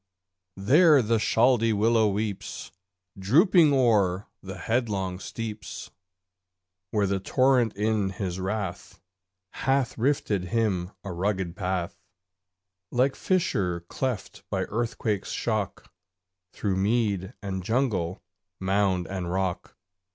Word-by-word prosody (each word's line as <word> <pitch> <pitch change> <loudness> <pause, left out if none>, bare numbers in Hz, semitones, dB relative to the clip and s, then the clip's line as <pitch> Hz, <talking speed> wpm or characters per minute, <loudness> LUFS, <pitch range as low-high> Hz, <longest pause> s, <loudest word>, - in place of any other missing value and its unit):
there 150 - +6
the 115 -1 +1
Chaldee 115 0 +3
willow 110 +1 +3
weeps 105 0 -3 0.5
Drooping 160 - +5
o'er 105 -8 +2 0.2
the 95 0 -8
headlong 100 -6 -1
steeps, 110 0 -6 1.0
Where 105 0 +1
the 100 0 0
torrent 125 +2 +2
in 105 -1 0
his 95 -1 -4
wrath 95 -1 -4 0.5
Hath 135 -2 0
rifted 110 -7 0
him 95 -3 0
a 100 - -5
rugged 95 -1 -2
path, 90 -3 -3 0.9
Like 130 +3 +1
fissure 100 - 0
cleft 105 +3 -4
by - - -1
earthquake's 110 -2 -2
shock, 105 -6 -3 0.6
Through 100 -3 -2
mead 100 -2 0
and 95 -2 -3
jungle, 110 -6 -1 0.4
mound 95 -1 +1
and 90 -1 -4
rock. 95 -1 -2
105 Hz, 105 wpm, -26 LUFS, 95-115 Hz, 1.0 s, there